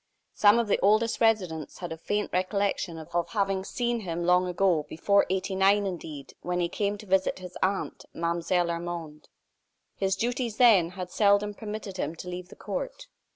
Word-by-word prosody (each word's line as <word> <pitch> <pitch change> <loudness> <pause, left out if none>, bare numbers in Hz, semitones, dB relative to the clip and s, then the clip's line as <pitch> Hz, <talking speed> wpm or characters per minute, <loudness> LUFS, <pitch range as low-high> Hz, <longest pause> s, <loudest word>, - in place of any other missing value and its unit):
Some 210 +2 +5
of 235 -2 +1
the 205 - +2
oldest 215 +4 +2
residents 185 -9 +1
had 175 -2 -6
a - - -3
faint 205 +4 -2
recollection 185 -2 0
of 160 +1 -10 0.2
having 195 -2 0
seen 240 +3 -1
him 175 -4 -3
long 180 +1 +4
ago, 180 -3 +2
before 200 +5 +2
'89 195 +2 +2
indeed, 160 -7 -6
when 180 0 -2
he 170 -1 0
came 205 +2 -1
to 210 - -11
visit 190 -1 +1
his 180 -1 -9
aunt, 195 +1 -1
Mlle. 170 +1 -1 0.3
Armande. 170 -3 -6 0.7
His 195 0 0
duties, 235 +1 -2
then, 210 -9 +6
had 180 -1 -5
seldom 205 0 +3
permitted 210 -2 -6
him 155 -1 -2
to 180 - -9
leave 180 0 -6
the - - -12
court. - - -5
190 Hz, 170 wpm, -27 LUFS, 175-210 Hz, 0.7 s, then